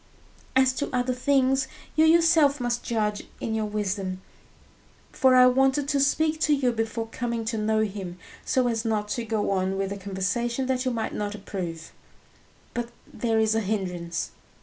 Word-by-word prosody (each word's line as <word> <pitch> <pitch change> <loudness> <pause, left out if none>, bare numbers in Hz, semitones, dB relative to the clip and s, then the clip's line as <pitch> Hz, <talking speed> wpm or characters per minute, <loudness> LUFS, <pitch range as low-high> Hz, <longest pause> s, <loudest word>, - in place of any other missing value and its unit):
"As 260 0 +4
to 285 - -1
other 250 -1 0
things, 265 0 +2 0.3
you 315 +1 +5
yourself 320 -3 +5
must 240 -1 -1
judge 210 -3 -1
in 220 - -3
your 220 -1 -1
wisdom; 195 -3 -2 0.9
for 260 -2 +4
I 250 0 +8
wanted 270 +2 +3
to 285 - +2
speak 310 +3 +2
to 305 -1 +3
you 260 -3 +1
before 225 0 -2
coming 235 -2 -3
to 225 0 -2
know 215 0 +1
him, 195 -4 -4 0.3
so 255 -1 +1
as 225 -2 -1
not 215 -2 -1
to 235 - -2
go 220 -3 -1
on 190 0 0
with 195 0 -2
a 200 - -3
conversation 200 +6 -2
that 255 0 -1
you - - +2
might 230 -2 -3
not 205 0 -3
approve. 175 -5 -6 0.8
But 240 -1 -3 0.2
there 225 -2 0
is 220 -1 +3
a 225 - +2
hindrance." 180 -5 -3
230 Hz, 170 wpm, -26 LUFS, 205-260 Hz, 0.9 s, I